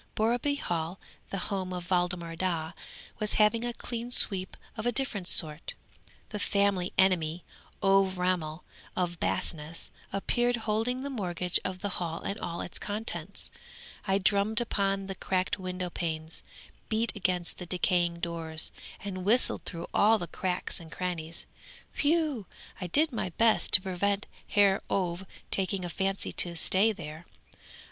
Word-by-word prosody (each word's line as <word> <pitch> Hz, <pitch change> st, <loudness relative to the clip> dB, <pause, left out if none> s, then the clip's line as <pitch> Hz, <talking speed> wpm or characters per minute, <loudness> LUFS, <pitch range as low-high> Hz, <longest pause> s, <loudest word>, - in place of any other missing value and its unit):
Borreby 240 Hz, +6 st, +2 dB
Hall, 170 Hz, -, -2 dB, 0.3 s
the 195 Hz, -, -3 dB
home 190 Hz, -2 st, -2 dB
of 180 Hz, 0 st, -6 dB
Waldemar 175 Hz, -2 st, 0 dB
Daa, 165 Hz, -2 st, -1 dB, 0.5 s
was 210 Hz, 0 st, -1 dB
having 220 Hz, +2 st, +4 dB
a 240 Hz, -, -1 dB
clean 235 Hz, 0 st, -5 dB
sweep 190 Hz, -6 st, +4 dB, 0.2 s
of 220 Hz, +1 st, -3 dB
a -, -, +3 dB
different 220 Hz, -7 st, -2 dB
sort. 155 Hz, -4 st, +5 dB, 0.5 s
The 210 Hz, -, -4 dB
family 200 Hz, -3 st, +1 dB
enemy, 175 Hz, -3 st, +3 dB, 0.4 s
Ové 195 Hz, -1 st, +4 dB
Ramel 180 Hz, -3 st, -1 dB, 0.3 s
from 180 Hz, -1 st, 0 dB
Basness, 160 Hz, 0 st, -2 dB, 0.2 s
appeared, 240 Hz, +5 st, +1 dB
holding 230 Hz, +4 st, 0 dB
the 280 Hz, -, -3 dB
mortgage 180 Hz, -6 st, 0 dB
of 185 Hz, 0 st, -4 dB
the 205 Hz, -2 st, -1 dB
Hall 165 Hz, -1 st, -2 dB
and 200 Hz, -, -3 dB
all 170 Hz, 0 st, -4 dB
its -, -, -4 dB
contents. 215 Hz, +2 st, -2 dB, 0.6 s
I 195 Hz, 0 st, +3 dB
drummed 200 Hz, +3 st, +2 dB
upon 195 Hz, -4 st, 0 dB
the 195 Hz, -, -4 dB
cracked 185 Hz, +1 st, -1 dB
window 185 Hz, -1 st, -4 dB
panes, 160 Hz, -2 st, -2 dB, 0.5 s
beat 225 Hz, +1 st, 0 dB
against 180 Hz, -3 st, 0 dB
the 180 Hz, -, -6 dB
decaying 175 Hz, -1 st, +1 dB
doors, 165 Hz, -2 st, -1 dB, 0.3 s
and 185 Hz, -2 st, -4 dB
whistled 230 Hz, +6 st, +2 dB
through 170 Hz, -1 st, -4 dB
all 220 Hz, +2 st, +5 dB
the 175 Hz, -, -4 dB
cracks 180 Hz, +1 st, -3 dB
and 165 Hz, -1 st, -12 dB
crannies, 170 Hz, -3 st, -4 dB, 0.5 s
whew! 300 Hz, -, +1 dB, 0.3 s
I 180 Hz, -, -2 dB
did 300 Hz, -, +3 dB
my 225 Hz, -6 st, -2 dB
best 230 Hz, -1 st, +4 dB
to 185 Hz, -, +8 dB
prevent 200 Hz, +2 st, 0 dB, 0.2 s
Herr 200 Hz, -1 st, +4 dB
Ové 185 Hz, 0 st, -1 dB, 0.2 s
taking 190 Hz, -1 st, +1 dB
a -, -, -4 dB
fancy 195 Hz, +2 st, -1 dB
to 175 Hz, -1 st, +1 dB
stay 195 Hz, +6 st, +3 dB
there. 160 Hz, -3 st, -8 dB
185 Hz, 150 wpm, -29 LUFS, 175-210 Hz, 0.6 s, to